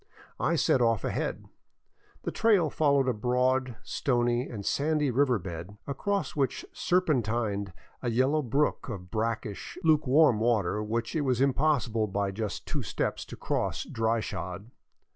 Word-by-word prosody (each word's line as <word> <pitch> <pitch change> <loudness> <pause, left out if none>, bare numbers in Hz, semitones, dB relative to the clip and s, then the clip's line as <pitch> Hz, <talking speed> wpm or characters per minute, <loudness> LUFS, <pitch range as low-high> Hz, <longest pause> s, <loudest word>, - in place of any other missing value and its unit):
I - - +1
set 130 - +3
off 115 -3 +2
ahead. - - -2 0.8
The - - -2
trail 205 -9 +3
followed 140 -3 +3
a 125 - +2
broad, 125 +2 +1
stony 120 0 0
and 105 -4 -6
sandy 150 -1 +1
river 130 -1 +3
bed 90 +1 -7
across 200 +8 -2
which 140 -3 -1
serpentined 115 - 0 0.3
a 125 - -1
yellow 130 +6 +2
brook 140 +1 0
of 90 -6 -7
brackish, 110 -3 -3
luke 155 -3 +3
warm 135 -4 +5
water 105 -4 +1
which 115 +7 -2
it 155 - +1
was 130 -4 +1
impossible 130 -5 +2
by 100 0 -1
just 105 0 -4
two - - -3
steps - - -2
to - - -9
cross - - -2
dry 115 0 0
shod. 95 +5 -6
120 Hz, 145 wpm, -28 LUFS, 105-140 Hz, 0.8 s, warm